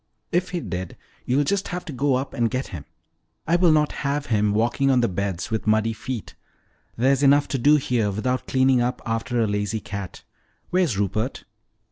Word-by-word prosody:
"If 180 Hz, +1 st, +1 dB
he 180 Hz, -, -2 dB
did, 90 Hz, -, -5 dB, 0.3 s
you'll 135 Hz, +4 st, +3 dB
just 200 Hz, +6 st, 0 dB
have 180 Hz, -1 st, -5 dB
to 155 Hz, -, -6 dB
go 135 Hz, +1 st, +1 dB
up 130 Hz, +2 st, -3 dB
and 115 Hz, -1 st, +1 dB
get 130 Hz, +3 st, -3 dB
him. 75 Hz, -6 st, -8 dB, 0.6 s
I 165 Hz, -, +2 dB
will 175 Hz, -1 st, +4 dB
not 150 Hz, -1 st, +3 dB
have 145 Hz, 0 st, -1 dB
him 105 Hz, -1 st, +2 dB
walking 120 Hz, +6 st, +1 dB
on 130 Hz, -2 st, +4 dB
the 120 Hz, -, +2 dB
beds 100 Hz, +2 st, -3 dB
with 110 Hz, -1 st, -2 dB
muddy 110 Hz, +1 st, +2 dB
feet. 120 Hz, 0 st, -6 dB, 0.6 s
There's 135 Hz, +4 st, +3 dB
enough 145 Hz, +1 st, +5 dB
to 135 Hz, -, -1 dB
do 145 Hz, +5 st, +5 dB
here 125 Hz, -7 st, +1 dB
without 125 Hz, +6 st, -2 dB
cleaning 130 Hz, -1 st, +3 dB
up 125 Hz, +1 st, -2 dB
after 115 Hz, +1 st, -1 dB
a 115 Hz, -, +3 dB
lazy 105 Hz, +1 st, -1 dB
cat. 100 Hz, -3 st, -7 dB, 0.5 s
Where's 175 Hz, -, +1 dB
Rupert?" 105 Hz, +5 st, -2 dB
125 Hz, 190 wpm, -23 LUFS, 110-140 Hz, 0.6 s, enough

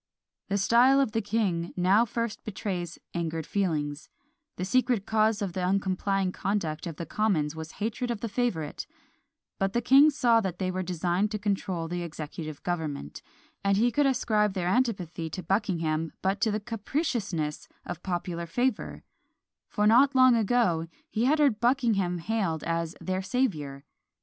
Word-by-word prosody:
The 200 Hz, -, 0 dB
style 240 Hz, +7 st, +5 dB
of 270 Hz, -5 st, +2 dB
the 225 Hz, -, 0 dB
king 195 Hz, -5 st, -1 dB
now 190 Hz, +6 st, +4 dB
first 230 Hz, 0 st, -3 dB
betrays 185 Hz, -5 st, -4 dB, 0.2 s
angered 165 Hz, -2 st, -2 dB
feelings; 155 Hz, -7 st, -2 dB, 0.5 s
the 180 Hz, -, -3 dB
secret 245 Hz, 0 st, +1 dB
cause 215 Hz, -1 st, +2 dB
of 190 Hz, -3 st, -3 dB
the 185 Hz, -, -2 dB
uncomplying 195 Hz, 0 st, 0 dB
conduct 175 Hz, -6 st, -2 dB
of 165 Hz, -, -5 dB
the 170 Hz, -, -5 dB
Commons 165 Hz, -9 st, 0 dB
was 160 Hz, 0 st, -7 dB
hatred 230 Hz, +3 st, -3 dB
of 230 Hz, -4 st, -3 dB
the 230 Hz, -, -2 dB
favourite 200 Hz, -10 st, -2 dB, 0.7 s
but 195 Hz, 0 st, 0 dB
the 240 Hz, -, +2 dB
king 275 Hz, +5 st, +7 dB
saw 240 Hz, -6 st, +3 dB
that 185 Hz, -4 st, -3 dB
they 185 Hz, -1 st, -1 dB
designed 180 Hz, +1 st, -1 dB
to 210 Hz, -, -2 dB
control 195 Hz, -5 st, -2 dB
the 175 Hz, +1 st, -3 dB
executive 155 Hz, -2 st, -7 dB
government, 155 Hz, -, -4 dB, 0.4 s
and 200 Hz, 0 st, +3 dB
he 240 Hz, +3 st, +3 dB
could 290 Hz, +3 st, +3 dB
ascribe 215 Hz, -6 st, +1 dB
their 180 Hz, -3 st, -2 dB
antipathy 185 Hz, -8 st, -1 dB
to 180 Hz, +4 st, -6 dB
Buckingham 165 Hz, -5 st, 0 dB
but 195 Hz, +2 st, 0 dB
to 220 Hz, -, +3 dB
the 210 Hz, 0 st, -1 dB
capriciousness 210 Hz, -, -2 dB, 0.2 s
of 175 Hz, -, -6 dB
popular 175 Hz, -2 st, -3 dB
favour; 245 Hz, +6 st, -1 dB, 0.6 s
for 210 Hz, -, 0 dB
not 260 Hz, +6 st, +5 dB
long 255 Hz, -1 st, +7 dB
ago 215 Hz, -7 st, +2 dB, 0.2 s
he 225 Hz, +3 st, +1 dB
had 295 Hz, +4 st, +4 dB
heard 280 Hz, -8 st, +3 dB
Buckingham 230 Hz, -8 st, +2 dB
hailed 175 Hz, -4 st, -1 dB
as 165 Hz, 0 st, -2 dB
"their 185 Hz, 0 st, -2 dB
saviour." 165 Hz, -, -2 dB
195 Hz, 160 wpm, -28 LUFS, 170-225 Hz, 0.7 s, king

